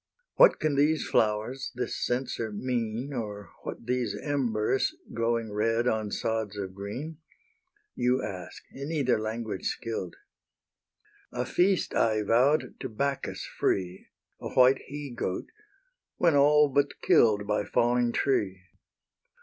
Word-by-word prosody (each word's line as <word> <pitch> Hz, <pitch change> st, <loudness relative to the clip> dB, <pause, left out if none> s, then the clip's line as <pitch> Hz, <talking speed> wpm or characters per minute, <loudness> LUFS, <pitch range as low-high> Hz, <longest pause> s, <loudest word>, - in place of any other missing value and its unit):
What -, -, +6 dB
can 155 Hz, -1 st, +1 dB
these 150 Hz, +2 st, +3 dB
flowers, 110 Hz, +5 st, 0 dB
this 125 Hz, -, -3 dB
censer 120 Hz, -3 st, -2 dB
mean 120 Hz, +3 st, -2 dB
Or 105 Hz, -4 st, -5 dB
what -, -, -7 dB
these 125 Hz, -3 st, -1 dB
embers, 130 Hz, -4 st, 0 dB, 0.2 s
glowing 115 Hz, -2 st, -1 dB
red 115 Hz, +3 st, +1 dB
On 110 Hz, -3 st, 0 dB
sods 110 Hz, -1 st, -2 dB
of 95 Hz, -2 st, -5 dB
green? 125 Hz, +12 st, -6 dB, 0.7 s
You 125 Hz, +2 st, +1 dB
ask, 90 Hz, -3 st, -7 dB
in 140 Hz, +3 st, -6 dB
either 135 Hz, -8 st, +1 dB
language 110 Hz, -2 st, -3 dB
skill'd! 105 Hz, -6 st, -4 dB, 1.2 s
A -, -, -2 dB
feast 185 Hz, -1 st, +1 dB
I 110 Hz, -2 st, +2 dB
vow'd 125 Hz, +8 st, +2 dB
to 130 Hz, -, -4 dB
Bacchus 140 Hz, +5 st, -2 dB
free, 95 Hz, -1 st, -2 dB, 0.3 s
A -, -, -5 dB
white 130 Hz, +1 st, +5 dB
he 145 Hz, -1 st, -6 dB
goat, 105 Hz, -6 st, -3 dB, 0.7 s
when 170 Hz, -4 st, +3 dB
all 150 Hz, +1 st, +6 dB
but 140 Hz, +1 st, 0 dB
kill'd 105 Hz, -3 st, +4 dB
By 105 Hz, 0 st, 0 dB
falling 120 Hz, +3 st, +2 dB
tree. 100 Hz, -9 st, 0 dB
120 Hz, 125 wpm, -28 LUFS, 105-140 Hz, 1.2 s, What